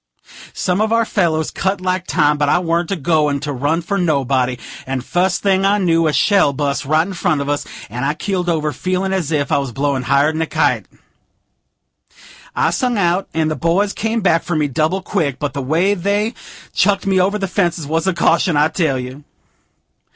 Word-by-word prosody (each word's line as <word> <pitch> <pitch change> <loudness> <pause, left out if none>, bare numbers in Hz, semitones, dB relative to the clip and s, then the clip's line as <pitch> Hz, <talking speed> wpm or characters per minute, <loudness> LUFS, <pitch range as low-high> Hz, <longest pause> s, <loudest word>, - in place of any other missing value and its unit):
Some 180 +3 0
of 220 0 +1
our 230 0 +3
fellows 160 -7 0
cut 190 0 -1
like 185 0 -2
time; 150 -1 +2
but 145 -1 +2
I - - +4
warn't 170 -1 -1
a 195 - 0
goin' 150 -3 +1
to 145 0 -3
run 145 +6 -1
for 200 +3 -2
nobody; 135 -6 +1 0.3
and, 130 -1 -3
fust 180 0 0
thing 195 -1 +2
I 200 +1 +3
knew, 165 -4 +2
a - - +2
shell 195 -3 +3
bust, 140 -2 -2
right 155 +3 +2
in 195 - -6
front 175 -4 0
of 140 - -3
us, 145 0 -2 0.2
and 120 +4 -5
I 145 +2 0
keeled 180 +1 -2
over, 155 -2 0
feelin' 185 +1 -2
as 175 -5 -2
if 145 -3 0
I - - +3
was 135 -3 -4
blowed 135 0 -1
higher'n 150 +4 +2
a 160 - -1
kite. - - 0 1.7
I - - +2
sung 250 -3 0
out, 180 0 +1
and 160 -1 +1
the - - -1
boys 175 +8 +1
come 225 +1 -1
back 165 -4 +3
for 175 - -3
me, 150 -1 +1
double 155 +8 -1
quick; 150 -10 -1
but 145 -2 -3
the 140 - -3
way 165 +9 +1
they 205 +4 -1 0.4
chucked 200 -1 +2
me 190 -1 +2
over 200 +3 +1
them 195 -2 -2
fences 175 -5 0
was 160 +4 -1
a 190 - +2
caution, 170 -1 +2
I 150 +2 +3
tell 155 -8 0
you. 130 +3 -7
165 Hz, 205 wpm, -18 LUFS, 145-190 Hz, 1.7 s, I